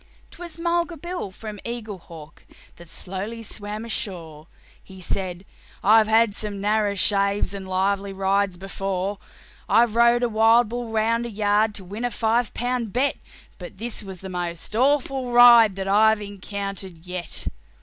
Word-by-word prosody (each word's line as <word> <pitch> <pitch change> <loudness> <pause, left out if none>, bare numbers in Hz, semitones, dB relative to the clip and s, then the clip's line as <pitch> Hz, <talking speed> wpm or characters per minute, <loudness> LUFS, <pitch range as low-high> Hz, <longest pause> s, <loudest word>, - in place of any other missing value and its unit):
'Twas 345 -2 -9
Mulga 340 0 0
Bill, 345 - -5
from 210 +2 -9
Eaglehawk, 190 -9 -8 0.4
that 170 -1 -13
slowly 200 +7 -5
swam 210 +1 -6
ashore: 170 -8 -5 0.4
He 190 -1 -13
said, 185 0 -3 0.4
"I've 215 +1 +6
had 220 -1 +4
some 205 -1 -4
narrer 205 0 +1
shaves 200 +1 +1
and 195 -1 -7
lively 195 +1 0
rides 195 -1 0
before; 195 +1 -3 0.5
I've 230 -1 +4
rode 235 +1 +4
a - - +3
wild 225 +1 +4
bull 240 0 -4
round 225 +2 +1
a - - -6
yard 210 0 +1
to 195 - -5
win 205 +6 -7
a 245 - +1
five 230 0 0
pound 245 -2 -2
bet, 260 +5 +1 0.4
But 180 +1 -10
that 215 - -10
was 240 - -4
sure 205 - -11
the 190 +2 -8
derndest 245 - -1
ride 235 -4 +8
that 195 0 -4
I've 220 +2 +4
encountered 195 -3 -6
yet. 180 -2 -5
210 Hz, 150 wpm, -23 LUFS, 190-230 Hz, 0.5 s, ride